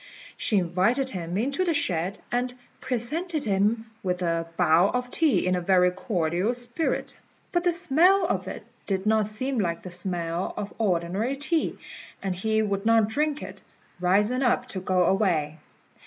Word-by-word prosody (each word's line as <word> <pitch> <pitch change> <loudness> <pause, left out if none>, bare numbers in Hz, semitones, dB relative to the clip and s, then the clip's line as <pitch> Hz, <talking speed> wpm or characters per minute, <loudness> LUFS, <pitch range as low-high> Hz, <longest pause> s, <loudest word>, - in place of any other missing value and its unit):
She 210 - +1
invited 195 +10 +1
him 175 -1 -4
into 275 - 0
the 340 -3 +1
shed, 180 - -1
and 245 +1 0 0.3
presented 300 +7 -2
him 210 +3 +1 0.2
with 180 -1 -2
a 165 -1 0
bowl 170 +5 +4
of 250 0 -2
tea 285 - +3
in 185 - +2
a 180 - -1
very 180 0 +4
cordial 180 +2 -1
spirit; 245 +6 -2 0.4
but 350 -1 +1
the 355 - +3
smell 350 +3 +3
of - - -1
it - - -6 0.2
did 195 -1 -1
not 215 -1 +3
seem 255 +4 -2
like 170 -4 -1
the 185 - -7
smell 175 -1 -3
of 200 - -5
ordinary 195 +5 0
tea, 305 +3 0 0.5
and 190 -2 -1
he 220 +3 +1
would 200 -2 -1
not 225 -1 +4
drink 300 +5 -1
it, - - -9 0.4
rising 205 +8 +2
up 250 -1 +1
to 190 - -4
go 185 0 +1
away. 170 -6 +1
210 Hz, 165 wpm, -26 LUFS, 180-250 Hz, 0.5 s, bowl